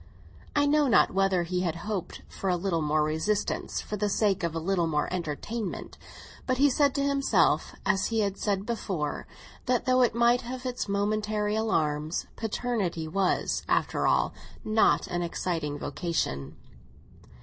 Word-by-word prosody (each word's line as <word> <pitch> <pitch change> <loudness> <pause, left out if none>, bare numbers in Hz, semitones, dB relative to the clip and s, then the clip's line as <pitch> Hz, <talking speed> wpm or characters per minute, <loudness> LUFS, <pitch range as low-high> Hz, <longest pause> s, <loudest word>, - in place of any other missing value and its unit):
I 290 0 +4
know 295 0 +3
not 230 - +4
whether 190 -2 +2
he 180 +1 -2
had 170 -3 -1
hoped 205 -4 -4
for 195 - -4
a 180 - +3
little 175 -2 -1
more 150 0 +2
resistance 160 +8 -1
for 210 - -5
the 205 +1 0
sake 200 -1 +1
of 170 -2 -2
a - - 0
little 175 0 +1
more 150 -2 0
entertainment; 180 +5 -4 0.5
but 255 -1 +1
he 285 +1 +5
said 280 +1 +2
to 280 - +1
himself, 270 - +2
as 195 -1 +2
he 225 -1 0
had 200 -2 0
said 200 -1 -1
before, 190 -10 -3 0.4
that 250 -2 +1
though 255 0 +4
it 235 -2 +3
might 235 +1 +4
have 255 +1 -7
its 250 -4 -3
momentary 210 +1 0
alarms, 155 -8 0
paternity 210 -7 -2
was, 190 +3 0
after - - +1
all, - - +2 0.3
not 215 0 +3
an 175 0 -2
exciting 165 -3 -2
vocation. 145 - -3
195 Hz, 160 wpm, -28 LUFS, 170-230 Hz, 0.5 s, he